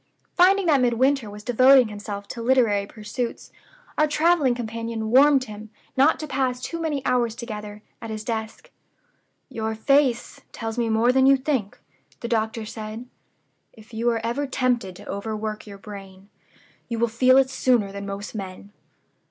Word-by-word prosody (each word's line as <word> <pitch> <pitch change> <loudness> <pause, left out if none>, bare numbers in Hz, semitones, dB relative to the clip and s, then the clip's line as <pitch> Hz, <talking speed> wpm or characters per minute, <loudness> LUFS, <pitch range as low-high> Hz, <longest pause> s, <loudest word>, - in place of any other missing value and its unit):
Finding 380 +2 +4
that 295 -5 +4
Midwinter 250 0 +2
was 210 +1 -10
devoting 255 +1 +5
himself 205 -1 -7
to 235 - -6
literary 230 -5 +2
pursuits, 230 +3 -5 0.5
our 305 - +4
traveling 300 -4 +2
companion 230 -1 -4
warned 275 +1 +6
him 215 -2 -10 0.3
not 280 +5 +4
to 310 - -5
pass 260 -3 -1
too 335 +6 -5
many 295 -5 -2
hours 240 -3 +1
together 210 -3 -7 0.2
at 230 - -7
his 215 -1 -5
desk. 220 -1 -5 0.8
'Your 220 -1 -4
face 260 +1 +1
tells 225 -1 -5
me 235 -2 0
more 225 +2 +3
than 265 +1 +4
you 275 0 +6
think,' 260 -7 -2 0.4
the 235 - -4
doctor 220 -1 -1
said: 215 +2 -7 0.7
'If 220 +1 -17
you 230 +2 0
are 230 -1 -1
ever 275 +5 -1
tempted 245 -8 -1
to - - -13
overwork 215 +1 -4
your 200 -1 -9
brain, 195 -1 -11 0.6
you 230 - -2
will 235 +1 +2
feel 255 +3 +4
it 265 -1 +3
sooner 245 -6 +1
than 200 0 -7
most 200 +1 -6
men. 195 -1 -8
230 Hz, 160 wpm, -24 LUFS, 215-260 Hz, 0.8 s, warned